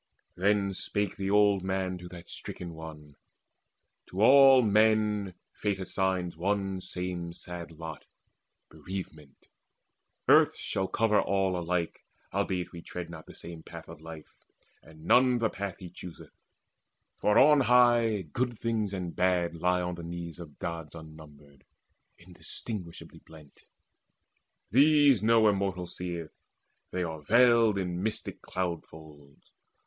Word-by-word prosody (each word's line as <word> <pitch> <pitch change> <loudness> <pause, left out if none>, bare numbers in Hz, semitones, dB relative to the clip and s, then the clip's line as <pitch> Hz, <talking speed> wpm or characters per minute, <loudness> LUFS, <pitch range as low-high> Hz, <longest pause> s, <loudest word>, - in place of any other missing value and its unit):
Then 100 +1 +1
spake 100 +1 -2
the 95 0 -3
old 100 -2 +4
man 95 -1 -2
to 90 0 -10
that 90 -1 -11
stricken 85 -2 -7
one: 75 -3 -11 0.9
"To 95 +3 -1
all 135 0 +8
men 105 -2 +2 0.2
Fate 100 -2 -2
assigns 95 -2 -1
one 95 +2 -1
same 90 -2 -5
sad 85 0 -7
lot, 80 -1 -9 0.7
Bereavement: 80 -3 -9 0.8
earth - - +5
shall 95 0 -2
cover 105 0 +2
all 95 -1 0
alike, 85 -1 -2 0.3
Albeit 95 -2 -1
we 85 - -9
tread 85 0 -7
not 80 -2 -10
the - - -12
same 85 -1 -9
path - - -11
of - - -12
life, 80 -1 -11 0.5
And 80 0 -16
none 125 +5 +5
the 115 -2 0
path 100 -2 -5
he 90 -2 -10
chooseth; 90 -1 -11 0.9
for 105 - +3
on 150 +1 +7
high 120 -4 +4
Good 120 - -3
things 110 -3 -1
and 90 -3 -4
bad 90 -2 +1
lie 90 +2 +1
on 90 0 -3
the 85 - -8
knees 85 0 -7
of 80 -4 -11
Gods 80 -2 -6
Unnumbered, 75 -3 -14 0.5
indistinguishably 90 +1 -8
blent. 75 -3 -17 1.1
These 145 -1 +5
no 110 0 +4
Immortal 95 -3 0
seeth; 85 -2 -6 0.6
they 90 - -2
are 80 -2 -5
veiled 115 +2 +4
In 90 -2 -2
mystic 110 +2 -3
cloud 90 -3 -3
folds. 75 -3 -16
90 Hz, 135 wpm, -29 LUFS, 85-105 Hz, 1.1 s, all